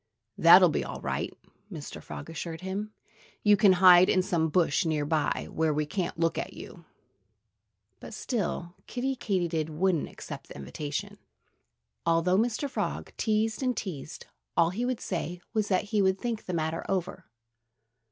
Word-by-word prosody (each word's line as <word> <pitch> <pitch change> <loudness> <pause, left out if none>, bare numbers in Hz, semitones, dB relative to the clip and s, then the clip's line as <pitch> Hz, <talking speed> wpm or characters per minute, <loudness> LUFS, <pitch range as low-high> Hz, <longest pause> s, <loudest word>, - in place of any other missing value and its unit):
"That'll 175 +2 +8
be 150 - -1
all - - -6
right!" - - -2 0.4
Mr. - - -7
Frog 70 -2 -8
assured 165 +1 -6
him. 195 +3 -4 0.5
"You 210 -1 +6
can 200 -1 +6
hide 180 0 +7
in 185 - +3
some 165 -3 0
bush 170 +1 +2
near 155 -3 0
by, 155 0 0
where 160 -1 +1
we 150 0 0
can't 180 +2 -3
look 165 0 +1
at - - -5
you." - - -11 1.1
But - - -9
still 180 -7 -3
Kiddie 265 +2 -2
Katydid 175 -9 -1
wouldn't 170 +1 0
accept - - -9
the - - -11
invitation. 145 - -5 0.8
Although 170 +3 +3
Mr. 240 +5 0
Frog 275 - -3
teased 220 +1 0
and 255 -2 0
teased, 155 -8 -6 0.3
all 170 0 +4
he 230 +6 -2
would 250 -2 -1
say 175 -1 -3
was 215 -2 +1
that 185 -3 +2
he 210 - +4
would 190 0 +3
think 235 -3 -3
the 180 - -4
matter 160 0 -1
over. 185 -2 -2
180 Hz, 160 wpm, -28 LUFS, 160-210 Hz, 1.1 s, That'll